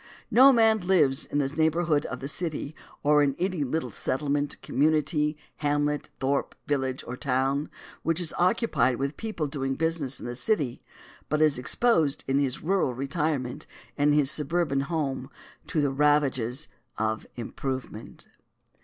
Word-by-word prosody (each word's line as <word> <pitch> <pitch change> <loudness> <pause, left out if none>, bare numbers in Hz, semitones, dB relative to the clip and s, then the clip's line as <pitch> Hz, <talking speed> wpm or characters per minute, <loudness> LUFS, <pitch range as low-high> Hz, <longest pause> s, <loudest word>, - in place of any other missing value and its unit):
No 265 +3 +8
man 225 -3 +4
who 175 - -9
lives 150 -8 +3
in - - -2
the 140 -2 +2
neighborhood 160 +1 +1
of 125 - -6
the 135 - -4
city, 155 -1 -3 0.3
or 150 0 +5
in 140 -2 +2
any 185 -4 -1
little 155 +5 -2
settlement, 145 +1 -1
community, 150 +1 +1 0.2
hamlet, 145 0 0
thorp, 135 +1 -1
village, 135 -2 -1
or 120 - -5
town 135 +3 0 0.3
which 165 +1 0
is 170 -3 0
occupied 180 - +2
with 140 +3 -3
people 215 -8 -3
doing 135 -2 -2
business 160 -4 0
in - - -8
the 120 - -4
city, 140 - -1 0.5
but 150 - +1
is 155 -4 +3
exposed 160 - +2
in 135 +1 +2
his 135 -1 -1
rural 175 -7 +1
retirement, 140 0 -2 0.3
in 145 0 +3
his 145 -2 +5
suburban 150 -1 +1
home, 135 -3 -2 0.4
to 155 - 0
the 140 -2 +1
ravages 140 -2 +1 0.3
of 110 0 -2
improvement. 125 -1 -6
145 Hz, 150 wpm, -27 LUFS, 135-160 Hz, 0.5 s, No